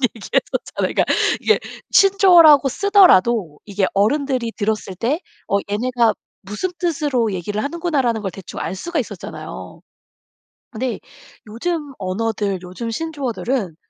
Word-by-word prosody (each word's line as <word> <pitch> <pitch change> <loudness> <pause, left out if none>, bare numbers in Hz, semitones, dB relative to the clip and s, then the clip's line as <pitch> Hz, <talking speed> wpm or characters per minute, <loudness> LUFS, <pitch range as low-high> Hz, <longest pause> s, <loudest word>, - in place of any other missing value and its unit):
얘기했었잖아요. 220 - -2
그니까 - - +2 0.4
이게 435 - +3 0.3
신조어라고 350 -8 +6
쓰더라도 240 - +4
이게 200 -1 0
어른들이 250 +3 +1
들었을 210 -3 -2
때 245 - -1 0.3
어 200 - +2
'얘네가 235 +1 +1 0.3
무슨 210 - -4
뜻으로 290 - 0
얘기를 205 +4 -3
하는구나.'라는 285 -8 -1
걸 195 - -3
대충 190 0 -9
알 - - -3
수가 335 - -3
있었잖아요. 205 -7 -7 0.9
근데 250 +1 -3 0.5
요즘 295 +7 -3
언어들 200 0 -2
요즘 185 +6 -6
신조어들은 255 - -3
235 Hz, 320 characters per minute, -20 LUFS, 205-300 Hz, 0.9 s, 신조어라고